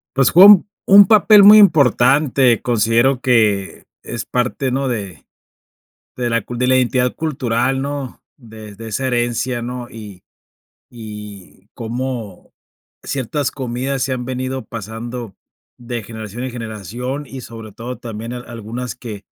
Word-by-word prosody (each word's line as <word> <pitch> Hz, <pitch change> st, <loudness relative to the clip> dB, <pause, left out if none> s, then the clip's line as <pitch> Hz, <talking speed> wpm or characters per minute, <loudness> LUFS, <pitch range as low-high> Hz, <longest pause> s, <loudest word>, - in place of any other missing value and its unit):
Pues, 135 Hz, -2 st, +3 dB
fue 185 Hz, +3 st, +8 dB
un 205 Hz, -1 st, +7 dB, 0.2 s
un 200 Hz, +1 st, +8 dB
papel 210 Hz, -1 st, +6 dB
muy 210 Hz, +2 st, +9 dB
importante, 135 Hz, -, +4 dB
considero 120 Hz, +3 st, +1 dB
que 110 Hz, -6 st, +1 dB, 0.2 s
es 120 Hz, -2 st, -6 dB
parte, 125 Hz, +2 st, -2 dB
¿no?, 135 Hz, +1 st, -1 dB
de 100 Hz, -9 st, -6 dB, 0.9 s
de 125 Hz, -1 st, -2 dB
la 115 Hz, -2 st, 0 dB
cul 120 Hz, +3 st, -8 dB
de 125 Hz, -, +1 dB
la 130 Hz, 0 st, +3 dB
identidad 125 Hz, 0 st, +1 dB
cultural, 130 Hz, -4 st, -1 dB
¿no?, 140 Hz, -2 st, -5 dB, 0.2 s
de 110 Hz, -5 st, -12 dB
de 115 Hz, +3 st, -9 dB
esa 130 Hz, +5 st, -3 dB
herencia, 120 Hz, 0 st, -1 dB
¿no?, 120 Hz, 0 st, -6 dB
y 105 Hz, -5 st, -11 dB, 0.7 s
y 105 Hz, -4 st, -11 dB
cómo 120 Hz, -4 st, -6 dB, 0.5 s
ciertas 140 Hz, +1 st, -3 dB
comidas 130 Hz, +1 st, -3 dB
se 130 Hz, -, -1 dB
han 125 Hz, -1 st, -3 dB
venido 130 Hz, +1 st, -4 dB
pasando 115 Hz, 0 st, -7 dB, 0.4 s
de 120 Hz, -2 st, -6 dB
generación 110 Hz, +2 st, -7 dB
en 130 Hz, -, -5 dB
generación, 120 Hz, -, -6 dB
y 130 Hz, 0 st, -9 dB
sobre 115 Hz, -3 st, -10 dB
todo 120 Hz, +5 st, -8 dB
también 115 Hz, 0 st, -7 dB
al 125 Hz, 0 st, -8 dB
algunas 120 Hz, +1 st, -6 dB
que 110 Hz, -5 st, -9 dB
120 Hz, 140 wpm, -18 LUFS, 115-130 Hz, 0.9 s, muy